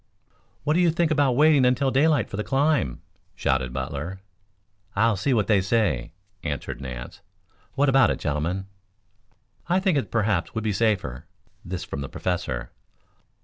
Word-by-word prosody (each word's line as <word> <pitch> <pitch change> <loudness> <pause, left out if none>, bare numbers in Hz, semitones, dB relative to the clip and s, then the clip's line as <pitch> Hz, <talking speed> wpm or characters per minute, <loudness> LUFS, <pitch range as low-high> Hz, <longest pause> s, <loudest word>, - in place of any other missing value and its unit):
"What 150 - +2
do 170 - +2
you 175 -1 +4
think 165 0 +1
about 145 -4 +3
waiting 150 -1 +5
until 130 +2 +2
daylight 145 -2 +3
for - - -7
the 105 - -2
climb?" 140 - +1 0.3
shouted 65 -1 0
Butler. 70 +8 -4 0.8
"I'll 110 +1 +3
see 110 +9 -1
what 110 -5 +2
they 105 -3 +3
say," 95 - 0 0.3
answered 70 -4 -4
Nance. 60 -2 -7 0.5
"What 145 +1 +3
about 135 -4 +5
it, - - 0
gentlemen?" 80 +5 -2 1.0
"I 180 +2 +3
think 190 -6 +2
it - - -5
perhaps 105 -6 0
would 110 - -2
be 110 -2 0
safer." 95 - -1 0.4
This 90 0 -5
from 70 - -5
the 70 - -5
Professor. 65 -9 -3
105 Hz, 155 wpm, -25 LUFS, -, 1.0 s, waiting